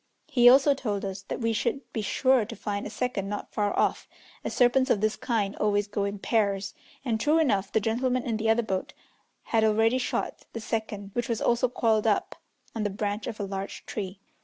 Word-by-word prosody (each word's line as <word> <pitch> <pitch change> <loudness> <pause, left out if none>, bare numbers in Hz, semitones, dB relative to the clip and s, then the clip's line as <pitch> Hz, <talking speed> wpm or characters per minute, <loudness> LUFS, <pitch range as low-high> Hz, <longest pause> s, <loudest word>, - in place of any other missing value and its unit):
He 245 -5 +6
also 275 +3 +6
told 210 -7 -3
us 195 0 -5
that - - -4
we 230 0 +1
should 270 +5 -1
be 220 - -1
sure 260 +3 +3
to 230 +2 -7
find 205 -2 -3
a - - -6
second 215 -4 -2
not 205 - -5
far 205 -2 +1
off, - - +1 0.4
as - - -3
serpents 260 +1 +3
of 210 - +3
this 215 +1 +1
kind 210 -4 -1
always 205 -1 +1
go 205 0 -1
in 200 +1 -3
pairs, 200 -2 0 0.3
and, 225 -3 0
true 300 +4 +3
enough, 205 -11 +1
the - - +3
gentlemen 245 +4 0
in 230 -2 -1
the 220 0 0
other 230 +2 +3
boat 190 -4 -3 0.5
had 225 -1 +1
already 225 +3 +3
shot - - -3
the 230 - -4
second, 215 -3 -4
which 240 0 -2
was 230 -1 0
also 240 +1 +2
coiled 225 -3 +1
up 210 - +1 0.4
on 225 - -3
the 210 - 0
branch 205 +1 -3
of 225 -3 -5
a - - -2
large 195 0 -5
tree. 190 -2 -5
220 Hz, 210 wpm, -27 LUFS, 205-240 Hz, 0.5 s, He